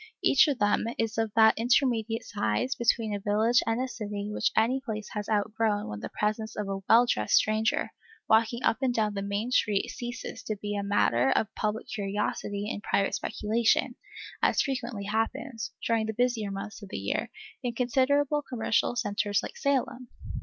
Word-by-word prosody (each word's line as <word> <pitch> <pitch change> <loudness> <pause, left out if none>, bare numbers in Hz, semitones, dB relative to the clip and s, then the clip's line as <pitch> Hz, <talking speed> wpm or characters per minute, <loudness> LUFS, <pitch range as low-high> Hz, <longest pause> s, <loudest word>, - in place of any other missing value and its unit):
Each 275 - +6
of 285 -4 0
them 205 -1 +2
is 225 0 -1
of 225 -1 0
that 220 -1 +6
intermediate 230 -2 +1
size 110 - -1
between 230 -4 +1
a 205 - -2
village 215 +4 +3
and 225 +1 +1
a 260 - -1
city 210 -4 -5
which - - +1
any 245 +5 +3
place 215 -4 -5
has 210 0 -4
outgrown 215 0 0
when 105 0 -5
the - - -6
presence 215 +1 -2
of 210 -1 -3
a 195 0 -3
well 235 +2 +7
dressed 105 - +1
stranger 215 +1 +2 0.4
walking 230 +2 +3
up 225 - +3
and 260 -2 +2
down 215 -2 +1
the 200 - -3
main 200 +4 -2
street 210 -5 +1
ceases 240 0 -6
to 215 - -2
be 205 0 -3
a 200 - -1
matter 135 -11 +2
of 215 - +1
public 215 +1 -2
curiosity 205 0 -3
and 205 - -4
private 200 -2 0
speculation, 225 +3 +1 0.5
as - - +3
frequently 240 -6 -3
happens, 225 +2 -2
during 225 -2 +1
the 220 - -2
busier 240 -2 0
months 200 +3 -6
of 200 - -10
the - - -5
year, - - -2 0.3
in 245 -2 -3
considerable 275 +4 +2
commercial 240 -3 0
centres 205 -3 0
like - - -7
Salem. 260 -3 -1
220 Hz, 180 wpm, -28 LUFS, 205-240 Hz, 0.5 s, well